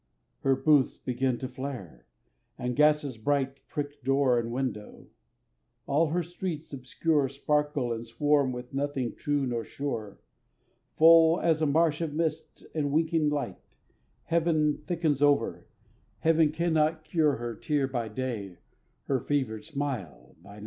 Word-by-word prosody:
Her 135 -1 +2
booths 135 0 +3
begin 130 0 -1
to 130 - -4
flare; 125 - -7 0.5
and 125 0 -3
gases 150 -4 +2
bright 135 +2 0
Prick 145 -1 -5
door 135 -2 +3
and 115 0 -4
window; 120 -5 -4 0.8
all 155 +4 +2
her 175 +3 0
streets 170 -3 -6
obscure 140 +2 0
Sparkle 145 -2 0
and 115 0 -6
swarm 145 +1 +2
with 125 0 -8
nothing 135 -3 -2
true 145 -2 -1
nor 120 -2 -2
sure, 115 -8 -5 0.8
Full 165 +1 +7
as 160 -2 +2
a 155 - +3
marsh 155 +1 +2
of 155 -3 -3
mist 160 -1 -3
and 145 -3 -1
winking 160 0 +2
light; 140 -10 -3 0.6
Heaven 160 -3 +1
thickens 160 -5 0
over, 145 -1 +2 0.5
Heaven 160 -1 +4
that 150 - -6
cannot 160 -2 +1
cure 155 -3 +2
Her 120 0 -4
tear 145 +4 0
by 120 -4 -3
day, 110 -5 -4 0.5
her 135 -2 0
fevered 120 -5 -2
smile 125 - -5
by 100 +3 -13
night. 105 - -12
145 Hz, 140 wpm, -28 LUFS, 125-155 Hz, 0.8 s, Full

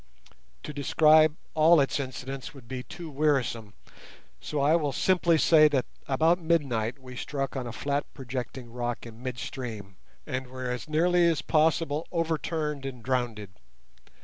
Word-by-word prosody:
To 150 - -6
describe 155 +2 +5 0.2
all 160 +1 +6
its 140 +1 +1
incidents 130 +1 -6
would 130 -4 -13
be 130 +1 -5
too 170 +6 -9
wearisome, 130 -8 0 0.6
so 150 - -4
I 145 +3 +4
will 150 -4 +1
simply 170 +3 +3
say 155 -1 +6
that 135 -4 0 0.2
about 160 +6 +3
midnight 135 -9 0
we 130 -1 -11
struck 135 +2 -3
on 130 -2 -3
a - - -5
flat 140 +5 -2
projecting 125 -2 -6
rock 120 -1 -3
in 115 0 -11
mid 125 -1 -4
stream 110 -7 -6 0.3
and 130 0 -4
were 130 0 -5
as 125 +4 -5
nearly 175 +3 +3
as 160 -2 +1
possible 160 -1 +1
overturned 160 -3 -2
and 130 -4 -7
drowned. 120 -5 -1
135 Hz, 150 wpm, -27 LUFS, 125-155 Hz, 0.6 s, all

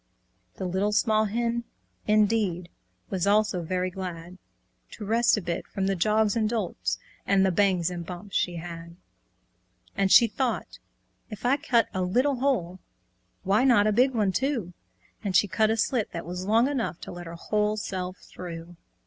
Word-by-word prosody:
The 190 - -5
Little 190 +3 0
Small 215 0 +2
Red - - -8
Hen, 235 0 0 0.4
indeed, 210 -5 +2 0.4
Was 185 0 0
also 210 -3 +2
very 185 +2 -2
glad 180 -1 -7 0.5
To 210 - -7
rest 230 +2 +3
a 210 - -3
bit 170 -1 -3
from 195 - -3
the 195 0 +1
jogs 215 +3 +2
and 220 -2 +1
jolts' 215 -6 -2 0.3
And 195 -1 +4
the 190 - +2
bangs 180 -2 +2
and 175 -1 -5
bumps 185 +3 -8
she'd 175 - +1
had. 170 0 -8 1.0
And 195 -2 +1
she 235 - +9
thought, 240 +3 -3 0.5
"If 215 +1 -8
I 255 +3 +4
cut 245 -6 +2
a 185 - -1
little 250 +10 +1
hole, 225 -10 0 0.6
Why 200 +5 +3
not 240 -6 +5
a 215 - +3
big 250 +4 +3
one 210 -4 +2
too?" 230 -4 -1 0.5
And 195 -3 -2
she 205 - +5
cut 215 +3 +2
a 225 - +1
slit 225 0 0
that 170 - -5
was 180 +2 -5
long 225 +4 +4
enough 255 -11 -2
To - - -7
let 175 -1 -8
her 165 - -7
whole 210 +4 0
self 185 -3 -4
through! 170 -1 -9
200 Hz, 175 wpm, -26 LUFS, 180-225 Hz, 1.0 s, she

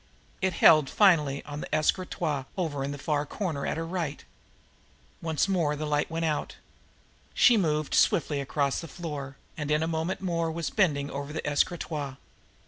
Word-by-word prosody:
It 190 -1 +1
held 155 -4 +6
finally 155 -9 +3
on 145 0 -6
an - - -7
escritoire 155 -3 0
over 155 -7 -2
in 140 - -3
the 145 - -5
far 145 0 0
corner 155 -2 -3
at - - -2
her 165 - -2
right. 165 -4 -4 1.0
Once 160 +2 0
more 170 -6 +1
the 155 +1 -4
light 150 0 0
went 165 +1 -2
out. 155 -2 -2 0.8
She 245 - +6
moved 155 -7 0
swiftly 145 -3 +3
across 140 +1 -1
the 165 - -7
floor, 145 -6 -6 0.2
and 150 -1 -4
in 150 +1 +2
a - - -1
moment 165 +3 -2
more 170 -3 -1
was 165 0 -3
bending 145 -9 +1
over 140 +1 -5
the 160 - -4
escritoire. 145 -2 -1
155 Hz, 170 wpm, -28 LUFS, 145-170 Hz, 1.0 s, held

